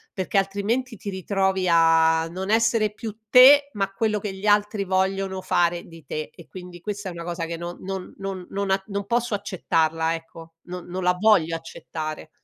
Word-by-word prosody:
Perché 190 +1 -1
altrimenti 210 +6 0
ti 200 - -6
ritrovi 190 0 0
a 165 -1 +4
non 190 +3 -5
essere 225 -1 +2
più 215 0 -7
te, 280 +4 +8
ma 195 -1 -1
quello 215 +1 0
che 205 -1 -4
gli 190 +2 -8
altri 205 -1 +2
vogliono 190 0 0
fare 175 -1 +1
di 165 -3 -14
te, 155 +3 -4
e 170 - -15
quindi 180 -1 -10
questa 205 -1 -5
è - - -6
una 170 0 -7
cosa 170 -1 -3
che 165 0 -5
non 170 +1 -6
non 190 -1 -6
non 195 -2 -5
non 200 0 -2
a 195 0 +2
non 200 -1 -3
posso 240 0 0
accettarla, 165 -4 0
ecco, 165 0 -11
non 180 0 -7
non 180 +1 -4
la 180 0 +2
voglio 185 -7 +4
accettare. 155 -1 -7
190 Hz, 190 wpm, -24 LUFS, 170-205 Hz, -, te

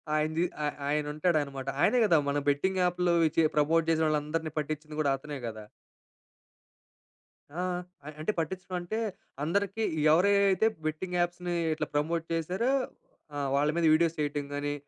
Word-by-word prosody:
ఆయనది. 155 +2 +1 0.2
ఆ - - +1 0.2
ఆయనుంటాడన్నమాట. 150 -2 0
ఆయనే 250 - +4
గదా! 170 -6 +5
మన 145 - 0
బెట్టింగ్ 185 +7 +1
యాప్‌లో 180 0 +1 0.2
చె 165 - +5
ప్రమోట్ 160 +2 +3
జేసిన 160 0 +3
వాళ్ళందరిని 155 +1 -1
పట్టించింది 150 0 -5
గూడా 140 -2 +2
అతనే 145 +1 -7
గదా! 110 -2 -7 1.9
ఆ! - - -1 0.5
అం - - -5
అంటే 185 - 0
పట్టించడంటే 180 +3 -3 0.5
అందరికి 200 +6 0 0.3
ఎవరియి 200 +5 +5
అయితే 195 +3 +2 0.2
బెట్టింగ్ 175 +4 -3
యాప్స్‌ని 175 0 -1 0.2
ఇట్లా 155 -1 -3
ప్రమోట్ 160 +3 0
జేసారో 180 - 0 0.6
ఆ! - - -3 0.2
వాళ్ళ 145 +2 +2
మీద 170 - +2
వీడియోస్ 165 0 +3
చేయటం 145 -1 -1
గాని, 145 0 -2
160 Hz, 135 wpm, -29 LUFS, 150-180 Hz, 1.9 s, గదా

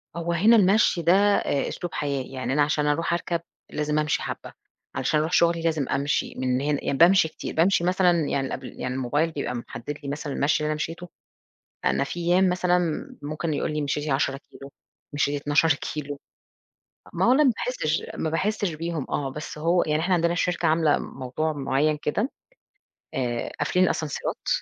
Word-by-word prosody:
هو 170 0 -2
هنا 210 +7 +5
المَشي 200 -3 +4
ده 170 +1 +4
آآ، 200 -7 +2
أسلوب 175 - -5
حياة، 140 -2 -1
يعني 130 0 -4
أنا 145 - +3
عشان 150 0 +1
أروح 165 +3 +1
أركَب، 170 0 -1 0.3
لازم 150 0 -1
أمشي 150 -1 0
حبة، - - -6 0.4
علشان 145 +4 +1
أروح 155 +2 -1
شغلي 170 -1 +3
لازم 160 -4 0
أمشي 140 +1 0
من 130 0 0
هنا 145 0 -1
يعني 140 - -1
بامشي 175 +2 +6
كتير، - - -7
بامشي 170 +2 +3
مثلًا 175 -3 +3
يعني 135 -1 -1
الأبل - - -5
يعني 125 - -2
الموبايل 145 +6 0
بيبقى 140 -5 -3
محدد 120 +4 -6
لي 140 - -4
مثلًا 145 0 -4
المَشي 145 +2 +1
اللي - - 0
أنا - - 0
مشيته. 165 +3 -5 0.8
أنا - - +2
في 175 +5 -6
أيام 180 +2 +3
مثلًا 180 0 +2 0.4
ممكن 155 +2 -3
يقول 150 - -1
لي 150 - -1
مِشيتِ 145 +1 -2
10 135 0 +1
كيلو، 140 0 -11 0.4
مِشيتِ 145 0 0
12 150 +2 +3
كيلو. 145 0 -5 0.9
ما - - 0
هو 245 - +6
أنا 295 +3 +5
ما 265 - +6
باحسش 160 -12 -1
ما 160 - -2
باحسش 195 +3 0
بيهم 165 -2 -3
آه 135 -2 -1
بس 150 +2 -7
هو 170 +3 +2
يعني 155 0 0
إحنا 180 +2 +2
عندنا 170 0 +2
الشركة 175 0 0
عاملة 160 -1 +3
موضوع 135 +5 -3
معين 145 +1 +1
كده 205 - -1 0.8
آآ، 120 -3 -2
قافلين 185 0 +2
الأسانسيرات 155 -4 -3
155 Hz, 180 wpm, -25 LUFS, 145-170 Hz, 0.9 s, بامشي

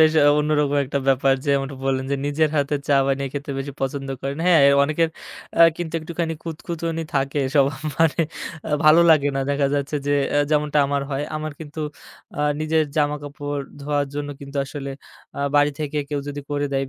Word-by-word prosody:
বেশ 155 0 +6 0.3
অন্যরকম 150 -1 +1
একটা 140 +1 -2
ব্যাপার 135 0 +4
যে্মন 140 -1 +2
টা 135 - -8
বললেন 130 -1 0
যে, - - +2
নিজের 150 +1 +1
হাতে 145 +1 +1
চা 140 - +5
বানিয়ে 135 0 0
খেতে 145 0 -5
বেশি 140 +1 -4
পছন্দ 135 +1 -2
করেন। 140 +3 -4
হ্যাঁ 170 -4 +6 0.2
অনেকের 155 +3 +2 0.5
অ্যা 170 - +8
কিন্তু 170 -1 -5
একটুখানি 165 +1 -3
খুঁতখুঁতনি 165 0 -4
থাকে 135 +1 0
সবার 140 -1 +3 0.2
মানে 165 0 +3 0.5
আ - - -5
ভালো 155 +2 +7
লাগে 145 -2 +5
না। 135 - 0
দেখা 140 0 +2
যাচ্ছে 145 +1 -1
যে 145 - +2 0.2
আ - - +4
যেমনটা 150 0 +2
আমার 140 0 0
হয় 140 +1 -1
আমার 155 0 -4
কিন্তু 155 0 -7 0.6
আ - - 0 0.2
নিজের 155 0 +2
জামাকাপড় 145 -1 -2 0.2
ধোয়ার 145 0 0
জন্য 145 0 -3
কিন্তু 140 0 -8
আসলে 140 0 -6 0.5
আ - - -2
বাড়ি 145 0 +5
থেকে 150 0 -2
কেউ 145 -1 -2
যদি 145 0 -5
করে 145 0 0
দেয়, 135 - +1
এই - - -10
145 Hz, 190 wpm, -22 LUFS, 140-155 Hz, 0.6 s, অ্যা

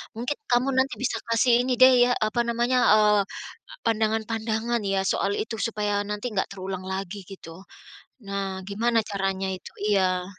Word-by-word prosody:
mungkin 245 +6 -3
kamu 245 +3 +3
nanti 265 0 +2
bisa 255 - -1
kasih 235 +1 +3
ini 255 0 0
deh 260 0 +9 0.2
ya, - - +2
apa 215 +2 0
namanya, 240 +2 +1 0.2
eee, 210 -1 +4 0.6
pandangan-pandangan 220 +1 0
ya 195 -1 +1
soal 200 - 0
itu 225 +1 -3
supaya 210 -3 -1
nanti 210 +4 -4
enggak 190 - -1
terulang 190 -1 -6
lagi 190 +1 -5
gitu, 185 -3 -11 0.7
nah 195 -1 -3
gimana 230 +3 +1
caranya 195 -1 -2
itu? 185 - -8 0.2
Iya. 185 -3 +2
210 Hz, 150 wpm, -25 LUFS, 195-235 Hz, 0.7 s, deh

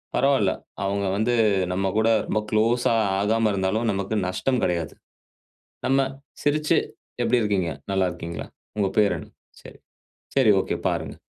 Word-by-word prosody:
பரவாயில்ல. 130 -8 +3 0.3
அவுங்க 100 0 -1
வந்து, 115 +3 +1 0.4
நம்ம 95 +1 0
கூட 110 +1 +3 0.2
ரொம்ப 110 - +1
குளோஸா 115 +2 +2 0.3
ஆகாம 110 +2 +2
இருந்தாலும், 100 +4 0
நமக்கு 100 +2 -2
நஷ்டம் 125 +7 0
கிடையாது. 85 -3 -1 0.9
நம்ம 135 +1 +3 0.4
சிரிச்சி 150 +1 +2 0.5
எப்பிடி 125 -1 +3
இருக்கீங்க? 95 -5 0 0.2
நல்லா 95 -1 +2
இருக்கீங்களா? 85 -1 -6 0.3
உங்க 100 -2 +1
பேர் 100 -4 +4
என்ன? 75 - -9 0.3
சரி. - - -13 0.6
சரி 130 -6 +5
ஓகே. - - -2
பாருங்க. - - -2
105 Hz, 135 wpm, -24 LUFS, 95-120 Hz, 0.9 s, சரி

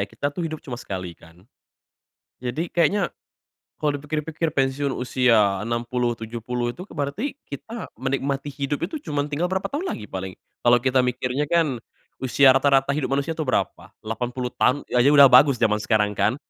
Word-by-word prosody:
kita 145 0 -3
tuh 175 - -3
hidup 155 -1 -6
cuma 125 - -5
sekali 90 -3 -6
kan. 85 +5 -19 1.0
Jadi 150 +8 -3
kayaknya 175 +1 +2 0.7
kalau 145 -2 +1
dipikir-pikir 155 +2 -3
pensiun 135 0 0
usia 115 -6 +2
60, 120 +1 -1
70 120 +2 -4
itu 180 - -9
berarti 145 - -3
kita 225 - -7
menikmati 135 +2 -2
hidup 140 +3 -2
itu 290 +9 -6
cuma 145 - -2
tinggal 155 +4 -1
berapa 190 0 -1
tahun 310 +7 -3
lagi 105 - -5
paling. 95 -1 -6 0.3
Kalau 120 0 +6
kita 130 +1 +2
mikirnya 125 +3 -1
kan 155 -8 +1 0.4
usia 130 +1 +5
rata-rata 135 +1 +3
hidup 145 -1 -1
manusia 140 +4 -1
tuh 155 -3 -4
berapa? - - -1 0.2
80 125 +3 -3
tahun 135 +3 +1
ya 125 - +3
itu 135 - +5
udah 140 - +10
bagus 135 +1 +7
jaman 105 -3 +1
sekarang 105 -2 +1
kan. 105 +5 +1
135 Hz, 165 wpm, -23 LUFS, 120-150 Hz, 1.0 s, udah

